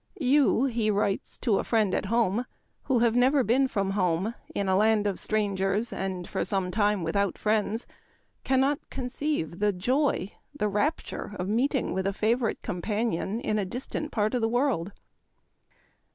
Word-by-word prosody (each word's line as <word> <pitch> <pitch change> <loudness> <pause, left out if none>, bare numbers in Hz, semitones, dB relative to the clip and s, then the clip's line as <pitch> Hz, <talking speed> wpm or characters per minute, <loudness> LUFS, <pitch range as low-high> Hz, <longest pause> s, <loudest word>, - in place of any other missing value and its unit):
" - - -40 0.2
You," 275 -3 +4
he 230 -4 0
writes 200 -1 0
to 220 -6 +1
a - - -1
friend 215 -5 +1
at - - -1
home, 230 +1 +1 0.4
"who 265 - +2
have 230 - +2
never 260 +2 +4
been 255 +5 +3
from 200 -5 -1
home 185 +2 0 0.2
in 200 - -1
a 190 - +3
land 215 +1 +3
of 200 -2 -1
strangers 205 0 0
and 185 -2 -4
for - - -2
some 190 -3 0
time 205 -1 +1
without 200 +4 0
friends, 215 +1 0 0.6
cannot 270 +2 +2
conceive 250 - -3
the 210 0 +3
joy, 240 +2 0 0.3
the 210 - +1
rapture 210 0 -2
of 180 - -3
meeting 255 +5 +1
with 190 +1 -1
a 200 - 0
favorite 225 +3 0
companion 210 +1 -2
in 215 -2 0
a - - 0
distant 255 +8 -4
part 215 0 0
of 250 - 0
the 225 - +1
world." 240 - 0
215 Hz, 165 wpm, -27 LUFS, 195-245 Hz, 0.6 s, You